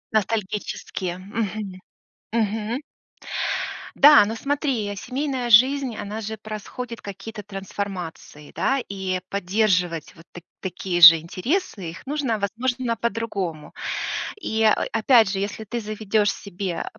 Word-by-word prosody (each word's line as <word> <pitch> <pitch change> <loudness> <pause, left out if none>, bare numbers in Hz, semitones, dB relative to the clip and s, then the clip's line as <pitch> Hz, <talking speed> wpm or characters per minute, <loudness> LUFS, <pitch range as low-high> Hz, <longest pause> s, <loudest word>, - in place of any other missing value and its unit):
Ностальгические. 200 -3 -2
Мгм. 205 -1 -4 0.5
Мгм. 225 +2 0 1.1
Да, 295 -2 +9
но 220 +2 -3
смотри, 280 -2 -1
я 205 0 -4
семейная 255 +3 -2
жизнь, 255 +2 +5
она 210 +2 -5
же 220 +1 -5
происходит 220 +3 -7
какие-то 205 +2 -8
трансформации, 195 -6 -6
да. 275 - +1
И 190 -2 -2
поддерживать 180 -4 0
вот 165 - -16
т 175 - -10 0.2
такие 185 -1 -2
же 165 0 +12
интересы, 190 - -2
их 170 +3 -10
нужно, 275 -5 -1
возможно, 240 +4 -1
по-другому. 200 -8 -3 0.7
И, 220 - -2
э, 220 - +6 0.2
опять 225 -1 +5
же, 195 - -1
если 205 +2 -3
ты 235 +3 -4
заведешь 215 -1 0
себе 190 -2 -4
210 Hz, 120 wpm, -24 LUFS, 190-230 Hz, 1.1 s, же